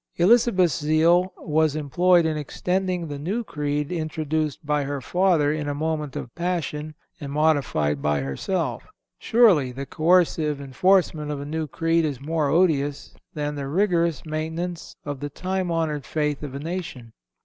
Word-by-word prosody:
Elizabeth's 185 -3 +4
zeal 165 +4 +3
was 155 -2 +1
employed 170 +4 +3
in 160 -1 0
extending 180 +4 -2
the 145 -1 -6
new 200 +11 -2
creed 150 -4 -2
introduced 155 -2 -2
by 150 0 +1
her 140 0 -3
father 165 -1 +2
in 150 -1 -3
a 145 - -2
moment 150 -2 -2
of 120 - -6
passion, 155 -4 -3 0.2
and 140 -2 -6
modified 140 - +1
by 75 0 +1
herself. 125 - -2 0.4
Surely, 200 - +4
the 135 +2 -6
coercive 155 -2 +2
enforcement 155 +2 +1
of 145 -1 -3
a 140 - -6
new 155 +1 -3
creed 165 +3 +1
is 145 -5 -2
more 150 +1 -1
odious 145 -4 +1 0.2
than 150 -1 -2
the 140 -2 -4
rigorous 170 -2 +1
maintenance 160 +3 -4
of 145 -2 -4
the 145 - -4
time 185 +4 -3
honored 160 -4 -1
faith 150 +3 -2
of 140 -3 -6
a - - -4
nation. 150 -8 -6
155 Hz, 155 wpm, -24 LUFS, 145-175 Hz, 0.4 s, Elizabeth's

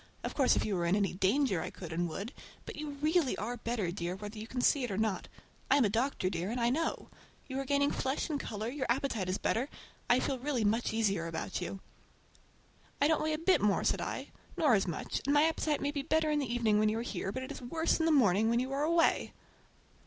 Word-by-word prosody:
Of - - -3
course 270 -3 +4
if - - 0
you 210 - -1
were 170 -1 0
in 175 - +3
any 200 -2 +1
danger 195 - +2
I - - -4
could 170 -3 -8
and 175 +1 -1
would, 200 - -5 0.3
but - - -7
you 295 -1 -6
really 315 -3 +2
are 230 +5 -3
better, 225 -6 -2
dear, 175 0 -3
whether 210 +2 -7
you 220 - -7
can 250 - -4
see 270 +2 +3
it 245 - -2
or 195 - -3
not. 220 -3 -1 0.4
I 280 - +6
am 270 - +4
a - - +2
doctor, 230 -3 0
dear, 180 0 -2
and 240 +3 -2
I 235 0 +2
know. 320 +5 -2 0.4
You 265 -1 -3
are 275 - -3
gaining 285 +1 +2
flesh 265 +1 -1
and 300 -4 -2
color, 215 -3 -4
your 260 +1 -3
appetite 235 -7 0
is 185 - 0
better. 250 +6 0 0.4
I 245 - +5
feel 265 -1 -1
really 255 -4 0
much 225 +3 +1
easier 200 -6 0
about 165 +3 -4
you." 190 +2 -5 1.2
"I 285 - +4
don't 315 0 +2
weigh 310 0 0
a - - 0
bit 350 +4 +3
more," 205 -1 +2
said - - +1
I, - - -4 0.3
"nor 295 -6 +4
as 195 -3 +3
much; 170 - -3
and 285 - +3
my 290 - +6
appetite 315 -2 +1
may 285 - 0
be 290 -1 -2
better 310 +2 +1
in 300 - +2
the 265 -5 -2
evening, 225 -3 +2
when 215 0 +3
you 220 - -1
are - - -1
here, 195 -5 -3
but 260 +5 -4
it 260 - -7
is - - -7
worse 320 +8 0
in 325 - +2
the - - +4
morning 220 - +4
when 235 +1 +2
you 260 +2 -2
are 275 +1 -1
away." 335 +2 +2
240 Hz, 255 wpm, -32 LUFS, 205-285 Hz, 1.2 s, I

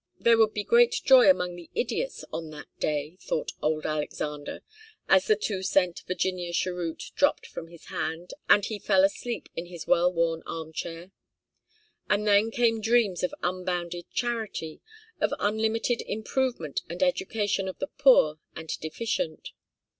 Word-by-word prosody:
There 230 -1 +4
would 220 -1 +4
be 210 - -1
great 470 - +4
joy 265 0 +8
among 180 -10 +2
the 175 -1 -12
idiots - - -2
on 160 -1 -4
that 150 -1 -9
day, 150 +3 -2
thought - - -2
old 155 0 0
Alexander, 150 -1 -4 0.4
as 190 0 +4
the 215 - +5
two 200 -2 -3
cent 185 -2 +1
'Virginia 180 -1 -2
cheroot' 175 -2 -2
dropped 285 +1 +2
from 165 - -8
his 170 -1 -15
hand, 165 +3 -4 0.2
and 205 - +6
he 215 -2 -4
fell 190 -2 +3
asleep 230 +4 -1
in 170 +1 -5
his 170 -2 -8
well 175 +1 +4
worn 165 -1 0
armchair. 165 +2 -6 1.0
And 210 0 +2
then 205 +2 +5
came 225 -1 +1
dreams 220 -5 +2
of 180 - -1
unbounded 175 -1 -3
charity, 225 -10 -3 0.4
of - - +1
unlimited 220 +3 0
improvement 220 - -2
and 175 - -2
education 225 - 0
of 185 - -5
the - - -2
poor 205 - +5 0.2
and 160 0 -8
deficient. 160 0 -3
185 Hz, 150 wpm, -27 LUFS, 165-225 Hz, 1.0 s, joy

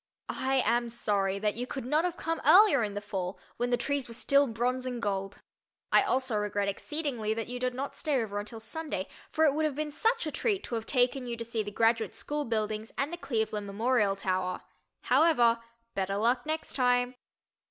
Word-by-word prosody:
I 265 0 +2
am 235 +1 +2
sorry 200 -4 0
that 210 +1 0
you 245 +2 -4
could 265 -3 -5
not 305 +6 +2
have 350 -1 -2
come 330 0 -2
earlier 360 - +7
in 205 -1 -3
the 205 - -3
fall, 190 -2 -4 0.2
when 245 +1 0
the 245 - +2
trees 280 +1 -1
were 230 - -7
still 280 +3 +3
bronze 250 +2 -1
and 245 -1 -3
gold. 195 -2 -3 0.5
I - - +7
also 260 - 0
regret 205 -1 -1
exceedingly 235 -1 -2
that 225 -1 -2
you 250 0 -4
did 250 0 -1
not 275 +2 -4
stay 295 -5 0
over 205 -3 -2
until 215 +2 -6
Sunday, 225 -3 -4 0.2
for 315 - +2
it 290 - +4
would 310 +2 0
have 305 -3 0
been 300 0 -3
such 455 +7 +1
a 305 - -2
treat 405 0 0
to - - -7
have 225 -1 -2
taken 250 0 +2
you 235 -1 -3
to 230 - -5
see 230 -1 -2
the 205 - -4
Graduate 225 0 +1
School 295 0 -2
buildings 215 -1 -2
and 285 +5 -1
the - - -3
Cleveland 220 -8 -2
Memorial 210 0 +2
Tower. 185 -1 -1 0.4
However, 240 -8 +4 0.3
"better 195 0 -1
luck 245 +5 +1
next 315 0 -3
time." 245 -1 +2
240 Hz, 205 wpm, -30 LUFS, 215-280 Hz, 0.5 s, earlier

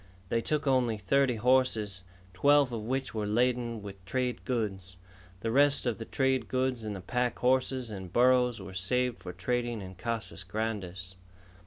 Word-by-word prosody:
They 115 - +1
took 150 +5 -1
only 125 -5 +2
thirty 130 +5 +2
horses, 110 -5 +2 0.3
twelve 140 +6 +4
of 115 - -3
which 130 +3 -2
were 105 -2 -2
laden 120 0 0
with 100 -2 -9
trade 125 +6 -2
goods. 95 -7 -2 0.5
The 115 - -1
rest 140 +2 +4
of 120 -3 -1
the 115 - -5
trade 130 +1 0
goods 130 -2 0
and 105 -1 -4
the 95 - -7
pack 125 +5 -1
horses 130 -1 +1
and 95 -4 -7
burros 125 +1 +4
were 95 - -9
saved 125 +6 0
for 90 - -7
trading 120 +6 -2
in 95 -2 -8
Casas 110 0 -3
Grandes. 95 -3 -4
115 Hz, 165 wpm, -30 LUFS, 100-130 Hz, 0.5 s, twelve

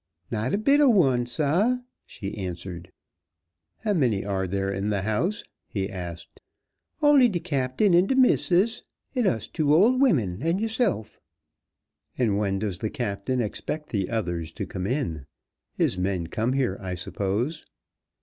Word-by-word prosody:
"Not 110 +5 -1
a - - +2
bit 280 +7 +4
ob 260 -6 +6
one, 130 -9 +3
sah," 165 - +1 0.3
she 100 -1 -6
answered. 90 -2 -6 0.9
"How 215 -2 +1
many 120 - +1
are 95 -2 -1
there 95 +1 -1
in 100 +2 -2
the 100 -2 0
house?" 110 - -1 0.2
he 95 -2 -2
asked. 85 -3 -8 0.6
"Only 285 -4 +6
de 180 -5 -1
captain 140 +7 +1
and 180 +3 +4
de 265 - +2
missus, 230 -4 +3 0.3
and 250 -6 +1
us 110 -3 0
two 150 -2 +2
old 240 +10 +4
wimmin 115 - +2
and 165 +5 +1
yo'se'f." 220 - -1 1.0
"And 110 -5 +1
when 100 -2 0
does 95 -3 -3
the 110 - -2
captain 120 0 -2
expect 150 +7 -4
the 100 -4 -1
others 85 -8 -2
to - - -4
come 95 0 -4
in? 95 - -2 0.5
His 90 - +1
men 90 -2 -1
come 110 +9 -1
here, 130 -8 0
I 90 -2 -4
suppose." 105 - -3
120 Hz, 155 wpm, -26 LUFS, -, 1.0 s, ob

